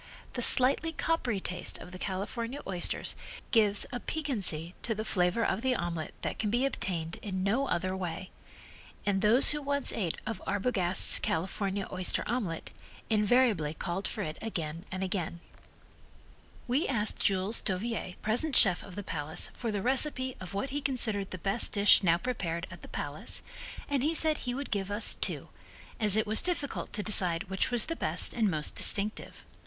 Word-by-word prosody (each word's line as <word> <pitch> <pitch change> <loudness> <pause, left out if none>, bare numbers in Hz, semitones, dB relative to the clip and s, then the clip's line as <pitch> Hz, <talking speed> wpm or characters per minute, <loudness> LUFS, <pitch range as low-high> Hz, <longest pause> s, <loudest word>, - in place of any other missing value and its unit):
The 245 - -4
slightly 270 +7 +6
coppery 285 -10 -1
taste 180 -1 -4
of 180 - -12
the 185 - -10
California 230 +8 -4
oysters 180 -3 -1 0.4
gives 210 -3 +4
a 245 - -3
piquancy 200 - -1
to 225 - -2
the 215 +1 -4
flavor 180 +3 +1
of 195 - -1
the 260 0 +1
omelet 170 -5 -4
that - - -4
can 210 - -1
be 240 +5 +1
obtained 170 -10 -4
in 190 -3 -4
no 235 +8 0
other 185 -1 -2
way, 185 0 -6 0.7
and 195 -1 0
those 225 +6 +6
who 295 0 -2
once 280 0 0
ate 180 -7 -2
of 220 -3 -5
Arbogast's 190 -4 +5
California 195 +3 -2
oyster 185 -1 0
omelet, 210 -9 -3 0.4
invariably 210 -7 +2
called 180 +4 -4
for 210 - -4
it 155 -2 -6
again 165 -5 -5
and 190 -1 -3
again. 180 -3 -3 1.3
We 260 +6 0
asked 220 -5 0
Jules 195 +3 +1
Dauviller, 195 -1 -3
the - - -20
present 245 +8 0
chef 180 -4 +7
of 185 - -12
the 205 - -6
Palace, 160 -1 -2
for 235 -3 -4
the 200 -2 -3
recipe 260 0 +3
of 185 +1 -8
what 260 +7 -3
he 290 +1 -3
considered 230 -8 0
the 185 - -6
best 195 +6 +1
dish 205 0 +6
now 170 -3 +3
prepared 175 -7 -4
at - - -11
the - - -12
Palace - - -4 0.4
and 280 -3 -1
he 310 +4 0
said 310 -1 +3
he 245 -1 -4
would 280 +1 -6
give 195 -2 -2
us 205 +2 +1
two, - - -3 0.5
as 210 -3 +5
it 220 0 +2
was 215 +1 +2
difficult 335 -6 -2
to 210 - -3
decide 180 -4 +1
which 190 - +1
was 240 -3 +2
the 330 - -4
best - - +3
and 225 -4 +1
most 155 -4 -2
distinctive. 210 +1 +1
205 Hz, 180 wpm, -29 LUFS, 185-245 Hz, 1.3 s, chef